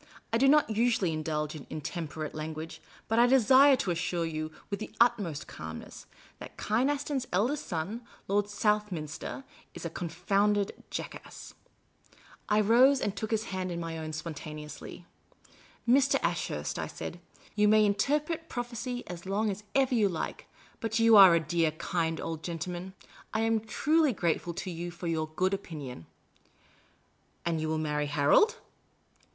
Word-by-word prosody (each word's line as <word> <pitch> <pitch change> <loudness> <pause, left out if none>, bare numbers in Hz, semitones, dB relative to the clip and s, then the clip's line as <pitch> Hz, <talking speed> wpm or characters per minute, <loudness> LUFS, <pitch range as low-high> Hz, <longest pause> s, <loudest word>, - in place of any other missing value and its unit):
I 230 - +3
do 270 - +5
not 295 -4 +5
usually 220 -6 +2
indulge 155 -1 -2
in 155 -4 -9
intemperate 155 0 -5
language; 155 +1 -6 0.3
but 225 +1 +2
I 240 - +7
desire 265 +2 +6
to 195 -7 -1
assure 170 0 -1
you, 155 -1 -4 0.2
with 200 - -2
the 215 - -6
utmost 215 -11 +2
calm 80 0 -7
ness, - - -11 0.3
that - - -10
Kynaston's 265 +3 0
eldest 240 +11 0
son, 185 +7 -3 0.3
Lord 205 +1 +2
Southniinster, 205 - -2 0.3
is - - -7
a 170 - -3
con 170 0 -4
founded 200 +4 +1 0.2
jackass." - - -7 1.0
I 210 0 +4
rose 250 +6 +5
and 205 -4 -2
took 215 +2 -4
his 220 -1 0
hand 185 -1 -2
in 170 - -3
my 165 -1 -4
own 160 -1 -5
spontaneously. 155 0 -7 0.4
" - - -27
Mr. 270 +3 +5
Ashurst," - - -2
I - - -2
said, - - -7 0.2
" - - -26
you 210 0 +4
may 215 0 +6
interpret 300 +10 0
prophecy 245 0 -4
as 175 +1 -8
long 205 +2 +1
as 200 +2 -7
ever 265 -1 +3
you 215 -4 +3
like, 170 - -4 0.3
but 225 0 -1
you 230 -1 +6
are 190 -4 +10
a - - +4
dear, 165 0 +1
kind 165 -1 -1
old 160 -1 -4
gentleman. 175 +2 -5 0.4
I 220 - +2
am 225 0 +2
truly 300 +6 +2
grateful 170 -2 -1
to 185 - -4
you 170 +1 -5
for 175 +1 -9
your 160 -2 0
good 185 +3 +1
opinion." 145 - -6 0.7
" - - -37
And 165 -2 0
you 155 - -1
will 160 - 0
marry 150 -1 -1
Harold 145 - +4
190 Hz, 165 wpm, -30 LUFS, 160-230 Hz, 1.0 s, are